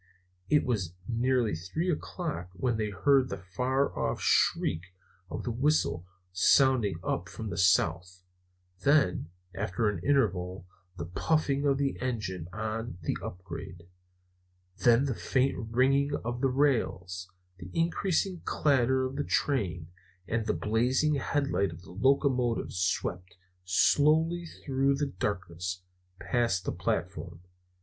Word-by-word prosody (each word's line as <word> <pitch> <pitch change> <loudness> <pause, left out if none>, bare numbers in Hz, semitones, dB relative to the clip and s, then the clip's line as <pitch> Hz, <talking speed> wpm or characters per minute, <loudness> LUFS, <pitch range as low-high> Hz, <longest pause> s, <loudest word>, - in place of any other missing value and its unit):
It 150 - +4
was 95 -8 -1
nearly 120 -1 +1
three 155 - -2
o'clock 155 - -4
when 115 +5 0
they 110 -1 -1
heard 130 +6 +3
the 100 - -4
far 125 +10 -1
off - - -1
shriek 80 - +2 0.5
of - - -5
the 120 - -2
whistle 115 - +1 0.2
sounding 115 +2 +4
up 85 0 -2
from 110 +3 -6
the - - -4
south; 90 0 +2 0.6
then, 140 - +2 0.2
after 100 +2 -1
an 105 - -3
interval, 95 -9 +1 0.3
the 85 - -4
puffing 140 - 0
of 135 -1 +3
the 140 -1 -1
engine 105 -9 -3
on 110 -1 -4
the - - -1
upgrade; 90 -1 -8 1.0
then 120 +3 +5
the 135 - 0
faint 130 0 0
ringing 135 +4 +2
of 120 +1 -3
the 135 - +3
rails, 95 -10 0 0.3
the 90 - -9
increasing 175 - 0
clatter 130 -2 +2
of 130 +2 -5
the 145 - 0
train, 90 - -1 0.4
and 115 -1 -1
the - - +2
blazing 125 +8 +1
headlight 140 -7 0
of 85 +2 -11
the - - -13
locomotive 125 +2 +1
swept 90 0 -2 0.3
slowly 155 - +3
through 135 -2 0
the 140 0 -2
darkness, 90 -2 -3 0.4
past 115 -7 0
the - - 0
platform. 85 -1 -3
115 Hz, 130 wpm, -29 LUFS, 90-140 Hz, 1.0 s, then